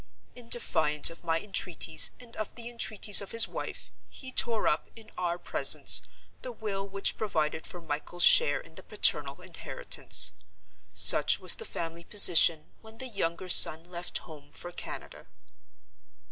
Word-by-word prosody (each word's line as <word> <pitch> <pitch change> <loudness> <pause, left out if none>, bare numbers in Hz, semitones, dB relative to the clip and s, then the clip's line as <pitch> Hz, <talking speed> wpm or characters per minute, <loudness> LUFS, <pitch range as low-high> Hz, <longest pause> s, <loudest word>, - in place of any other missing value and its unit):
In 240 -2 -14
defiance 155 -11 +1
of 165 - -15
my 165 -1 -2
entreaties, 165 -5 0
and 240 -2 -15
of 215 -1 -7
the 235 -1 -8
entreaties 215 -3 +3
of 200 - -10
his 230 0 +7
wife, - - -9 0.2
he 260 -1 -9
tore 230 -3 0
up, - - -2
in 220 -1 -16
our 175 -1 -4
presence, - - +2 0.4
the 255 - -7
will 200 -4 -7
which 195 0 -1
provided 160 -6 -4
for 175 - -9
Michael's 165 +2 -4
share 480 - +5
in - - -17
the - - -10
paternal - - +1
inheritance. - - -1 0.6
Such - - +2
was - - +3
the 455 - -6
family 165 - -7
position, 170 -5 +4
when 220 0 -16
the 260 +1 -7
younger 185 -4 -4
son 165 -2 +5
left 175 0 -7
home 145 -3 -15
for 175 - -10
Canada. - - -10
185 Hz, 155 wpm, -27 LUFS, 165-220 Hz, 0.6 s, his